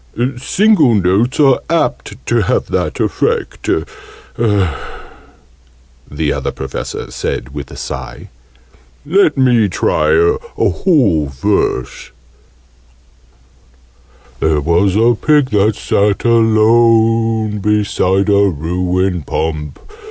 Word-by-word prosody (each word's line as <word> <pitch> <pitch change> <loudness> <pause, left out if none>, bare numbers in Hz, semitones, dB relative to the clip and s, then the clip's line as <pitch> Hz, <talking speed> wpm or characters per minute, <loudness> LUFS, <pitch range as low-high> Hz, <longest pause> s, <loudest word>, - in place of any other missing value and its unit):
"Single 165 - +3
notes 100 +8 +1
are 135 -3 +4
apt 165 0 -2
to - - 0
have - - -1
that - - -2
effect," 465 0 -2 2.4
the 75 0 -1
Other - - -3
Professor 65 -1 -6
said 65 +3 -4
with 70 -2 -7
a - - -11
sigh. - - -7 0.8
"Let 160 -1 +2
me 120 -5 +3
try - - 0
a 425 +2 +2 0.3
whole 110 - +1
verse, 65 -1 -2 2.3
There 80 -1 +1
was 85 +5 +1
a 115 +3 +3
Pig, 145 +2 +1
that 105 +1 +2
sat 100 +2 0
alone, 115 -1 +2
Beside 100 -2 0
a 100 -1 +3
ruined 90 +1 -2
Pump. 75 -2 -3
105 Hz, 95 wpm, -15 LUFS, 85-120 Hz, 2.4 s, are